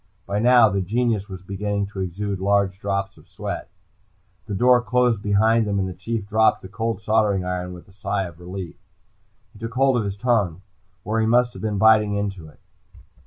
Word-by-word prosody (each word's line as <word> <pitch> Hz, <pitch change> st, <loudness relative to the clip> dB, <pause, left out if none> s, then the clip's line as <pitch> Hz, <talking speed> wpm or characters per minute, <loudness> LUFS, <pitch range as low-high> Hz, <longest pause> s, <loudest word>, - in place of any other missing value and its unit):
By 100 Hz, +1 st, -2 dB
now, 120 Hz, 0 st, +6 dB
the 100 Hz, -2 st, 0 dB
genius 110 Hz, +1 st, -1 dB
was 95 Hz, -1 st, -8 dB
beginning 100 Hz, +1 st, -2 dB
to 95 Hz, -, -6 dB
exude 95 Hz, +2 st, -3 dB
large 100 Hz, -1 st, +1 dB
drops 100 Hz, 0 st, -2 dB
of -, -, -20 dB
sweat. -, -, -6 dB, 0.8 s
The 105 Hz, -, -3 dB
door 125 Hz, +4 st, +5 dB
closed 125 Hz, -3 st, +1 dB
behind 110 Hz, +2 st, +3 dB
them, 100 Hz, -1 st, 0 dB
and 95 Hz, -1 st, 0 dB
the 95 Hz, -, -5 dB
Chief 105 Hz, +3 st, -4 dB
dropped 110 Hz, +1 st, +2 dB
the -, -, -7 dB
cold 110 Hz, +1 st, -3 dB
soldering 105 Hz, -4 st, +2 dB
iron 90 Hz, 0 st, -3 dB
with 90 Hz, -, -13 dB
a -, -, -18 dB
sigh 100 Hz, 0 st, -2 dB
of 85 Hz, -3 st, -9 dB
relief. 90 Hz, 0 st, -7 dB, 0.8 s
He 105 Hz, -, -16 dB
took 115 Hz, +1 st, -6 dB
hold 135 Hz, -1 st, +3 dB
of 115 Hz, -, 0 dB
his 100 Hz, 0 st, -4 dB
tongue, 100 Hz, -7 st, 0 dB, 0.4 s
where 110 Hz, +3 st, -1 dB
he 110 Hz, -, +1 dB
must 120 Hz, +1 st, +3 dB
have -, -, -10 dB
been 105 Hz, -2 st, -2 dB
biting 105 Hz, -1 st, +4 dB
into 100 Hz, -5 st, -3 dB
it. 75 Hz, -, -18 dB
100 Hz, 200 wpm, -23 LUFS, 95-110 Hz, 0.8 s, now